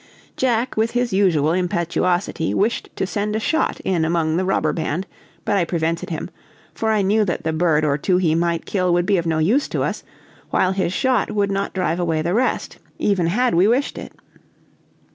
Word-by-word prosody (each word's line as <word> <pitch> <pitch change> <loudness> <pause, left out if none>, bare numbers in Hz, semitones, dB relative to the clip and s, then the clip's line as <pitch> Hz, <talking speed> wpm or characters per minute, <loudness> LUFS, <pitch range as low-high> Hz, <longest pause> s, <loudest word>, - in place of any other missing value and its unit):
Jack, 245 -1 0
with 220 +1 +1
his 245 -2 0
usual 170 -6 +3
impetuosity, 175 -1 0
wished 220 +4 0
to - - -1
send 205 +3 -2
a - - +1
shot 315 +8 0
in 175 -4 0
among 160 -1 +1
the 185 - +1
robber 185 -5 +1
band, 165 +3 -2 0.4
but 205 - +1
I 185 - +3
prevented 165 -1 -2
him, 160 -2 -5 0.4
for 220 - -2
I 215 -2 +2
knew 210 +3 +3
that 180 -5 -2
the 160 - -1
bird 155 -2 +2
or 145 0 +1
two 180 +4 +2
he 170 -4 +2
might 170 0 0
kill 180 -3 0
would 175 0 +2
be 200 0 +2
of 170 -1 -1
no 160 -1 +1
use 210 - +2
to - - -2
us, - - -2 0.5
while 185 - +2
his 185 -3 -1
shot 255 +1 +1
would 205 -2 0
not 195 0 -2
drive 175 -2 0
away 165 -3 0
the 170 +2 -1
rest, 250 +4 -1 0.2
even 190 -5 +1
had 245 +8 +1
we 175 +4 +4
wished 250 +5 0
it. - - -9
180 Hz, 200 wpm, -21 LUFS, 165-210 Hz, 0.5 s, we